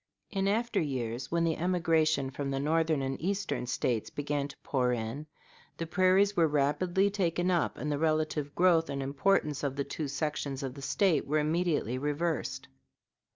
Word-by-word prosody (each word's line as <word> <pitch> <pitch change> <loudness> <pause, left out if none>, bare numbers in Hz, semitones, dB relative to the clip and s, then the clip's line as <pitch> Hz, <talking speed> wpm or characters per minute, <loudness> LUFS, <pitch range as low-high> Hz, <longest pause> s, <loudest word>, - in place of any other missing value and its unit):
In 195 -1 0
after 230 +4 +1
years, 125 -4 -3
when 170 0 +2
the 165 -1 +1
emigration 160 -5 +1
from 140 0 -4
the 135 0 -1
Northern 155 0 +1
and 135 0 -3
Eastern 195 -7 -2
States 120 -2 -1
began 145 -1 -2
to 145 - -13
pour 125 -3 +1
in, 120 +6 -4 0.5
the 165 - -3
prairies 185 +4 +3
were 165 -3 +4
rapidly 155 +7 +1
taken 180 -2 0
up, 175 -2 0
and 150 - -3
the 145 - -1
relative 155 -2 0
growth 170 -3 +4
and 140 -1 -2
importance 150 +1 +1
of 140 -2 -2
the 140 - -1
two 150 +1 -4
sections 140 -1 -3
of 130 -2 -4
the 140 - -10
State 170 +3 +1
were 150 +2 +1
immediately 155 -5 0
reversed. 145 -2 -2
150 Hz, 170 wpm, -30 LUFS, 140-175 Hz, 0.5 s, were